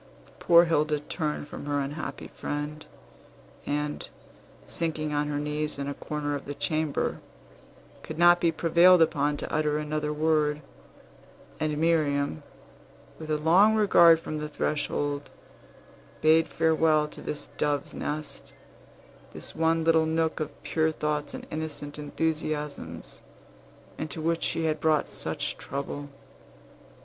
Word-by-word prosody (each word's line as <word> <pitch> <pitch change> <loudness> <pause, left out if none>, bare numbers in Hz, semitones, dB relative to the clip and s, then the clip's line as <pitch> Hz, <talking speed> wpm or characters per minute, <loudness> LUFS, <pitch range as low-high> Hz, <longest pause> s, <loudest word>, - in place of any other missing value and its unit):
Poor 170 0 +6
Hilda 155 -2 +1
turned 150 0 -3
from 145 - -8
her 145 0 0
unhappy 145 +3 -5
friend, 150 +1 -5 0.8
and, 150 0 -2 0.6
sinking 155 -2 -2
on 145 0 0
her 145 -1 -2
knees 150 +1 -2
in 140 0 -4
a 140 - -2
corner 145 0 -4
of 145 - -4
the 145 - -5
chamber, 155 -2 -1 0.8
could - - -8
not 175 +1 +6
be 170 - +3
prevailed 175 +2 +5
upon 145 -2 +2
to - - -6
utter 150 -1 +1
another 150 0 -2
word. 150 -1 +1 1.0
And 155 -1 -1
Miriam, 145 - +1 0.8
with 155 -1 -8
a 155 - +1
long 180 +8 +5
regard 170 -6 +6
from 155 -1 -5
the 150 0 -4
threshold, 145 -1 -2 0.9
bade 160 +1 +4
farewell 160 -1 +2
to - - -12
this 150 - -5
doves' 145 -1 0
nest, 150 -2 -5 0.8
this - - -7
one 165 0 +2
little 160 -1 +4
nook 160 0 0
of 155 -2 -6
pure 160 0 +1
thoughts 150 -1 -2
and - - -8
innocent 150 -2 -5
enthusiasms, 150 - -3 0.8
into 155 0 -5
which 165 +1 0
she 165 - -1
had 155 -1 -1
brought 155 -2 +2
such - - -3
trouble. 140 +1 -5
155 Hz, 130 wpm, -27 LUFS, 145-160 Hz, 1.0 s, Poor